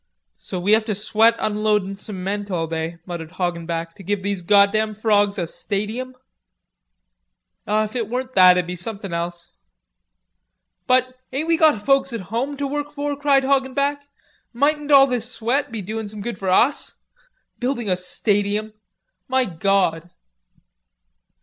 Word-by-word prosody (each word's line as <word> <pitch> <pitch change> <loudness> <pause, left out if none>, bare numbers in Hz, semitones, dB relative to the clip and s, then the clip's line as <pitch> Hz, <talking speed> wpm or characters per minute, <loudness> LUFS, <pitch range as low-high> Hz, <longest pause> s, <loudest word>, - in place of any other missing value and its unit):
"So 185 - -6
we 190 +4 0
have 220 +1 +5
to 215 -2 -2
sweat 220 +3 +3
unloadin' 210 -2 0
cement 200 +1 -4
all 170 -4 -1
day," 165 +1 -4
muttered 170 -2 -7
Hoggenback, 170 -2 -3
"to - - -11
give 200 +1 -2
these 200 -2 -2
goddam 210 +3 +3
frawgs 205 -1 +2
a 175 - -1
stadium." 215 +9 -4 1.5
"If 215 +1 0
it 230 -4 -2
weren't 255 +2 -3
that 185 -1 +7
it'd 180 - +1
be 180 +1 -5
somethin' 195 0 -4
else." 170 0 -4 1.4
"But, 255 0 +2
ain't 285 +5 -2
we 335 - +4
got 305 -10 +3
folks 275 -2 +3
at 230 - -3
home 270 +5 -2
to 285 - -2
work 290 +1 -3
for?" 290 -1 -3
cried 280 -1 +3
Hoggenback. 280 +1 0 0.5
"Mightn't 295 +4 +1
all 275 -1 +9
this 245 -2 -2
sweat 245 +5 -1
be 220 -3 -4
doin' 220 +2 -4
some 210 0 -7
good 240 +1 -5
for 190 - -2
us? 245 +10 +2 0.6
Building 245 -2 -2
a 185 - +2
stadium! 205 +3 -1 0.5
My 260 0 +2
gawd!" 180 -2 0
215 Hz, 150 wpm, -21 LUFS, 190-255 Hz, 1.5 s, all